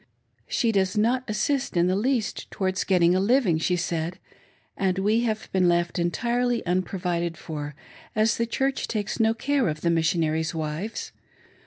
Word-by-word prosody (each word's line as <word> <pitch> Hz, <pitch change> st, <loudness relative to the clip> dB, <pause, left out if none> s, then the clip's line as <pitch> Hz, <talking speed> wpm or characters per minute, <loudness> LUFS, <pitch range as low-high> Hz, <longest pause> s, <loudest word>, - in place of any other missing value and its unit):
" -, -, -44 dB
She 230 Hz, -3 st, +1 dB
does 190 Hz, -2 st, +1 dB
not 240 Hz, +5 st, +2 dB
assist 265 Hz, +1 st, 0 dB
in 170 Hz, -, +4 dB
the 185 Hz, +1 st, +2 dB
least 235 Hz, +1 st, -1 dB
towards 185 Hz, -1 st, -1 dB
getting 180 Hz, -2 st, +4 dB
a 185 Hz, -, +2 dB
living," 200 Hz, -5 st, +3 dB
she 180 Hz, +3 st, +1 dB
said, 170 Hz, 0 st, -2 dB, 0.3 s
" -, -, -35 dB
and 190 Hz, -1 st, 0 dB
we 210 Hz, +4 st, +2 dB
have 220 Hz, -1 st, -2 dB
been 185 Hz, -1 st, +3 dB
left 175 Hz, +1 st, +1 dB
entirely 235 Hz, +8 st, 0 dB
unprovided 175 Hz, -2 st, -1 dB
for, 150 Hz, -3 st, -6 dB, 0.4 s
as 215 Hz, +2 st, +2 dB
the 235 Hz, -, 0 dB
Church 270 Hz, +3 st, -1 dB
takes 210 Hz, 0 st, -3 dB
no 225 Hz, 0 st, +3 dB
care 275 Hz, +1 st, +1 dB
of 155 Hz, -1 st, -3 dB
the 170 Hz, -, +2 dB
Missionaries' 160 Hz, -1 st, +1 dB
wives. 160 Hz, +8 st, -4 dB
190 Hz, 170 wpm, -25 LUFS, 170-225 Hz, 0.4 s, in